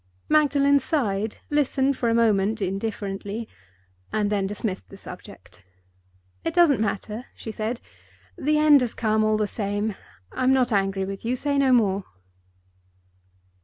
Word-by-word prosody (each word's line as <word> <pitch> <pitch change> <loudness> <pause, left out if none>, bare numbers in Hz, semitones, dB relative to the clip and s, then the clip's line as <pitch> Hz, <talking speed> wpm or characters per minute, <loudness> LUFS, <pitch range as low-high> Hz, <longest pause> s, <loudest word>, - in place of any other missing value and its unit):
Magdalen 285 -2 +4
sighed, 220 -8 -1
listened 280 -1 +2
for 235 - 0
a 230 - +2
moment 220 -2 +2
indifferently, 200 +2 -3 0.6
and 210 -1 0
then 200 -2 +1
dismissed 200 -1 -4
the 195 - -12
subject. 145 - -11 0.8
"It 330 0 -2
doesn't 340 -7 +5
matter," 215 +2 -3
she 220 - -7
said. 220 +3 -3 0.6
"The 300 +1 +1
end 300 -2 +6
has 245 -3 -2
come 215 -1 +1
all 215 0 +2
the 215 - +1
same. 205 +1 -2 0.4
I'm 255 +1 +2
not 255 -2 +2
angry 195 -1 +1
with 195 0 -6
you. 240 +2 0
Say 285 +2 -1
no 270 -1 +3
more." 200 -5 +3
220 Hz, 140 wpm, -24 LUFS, 200-265 Hz, 0.8 s, end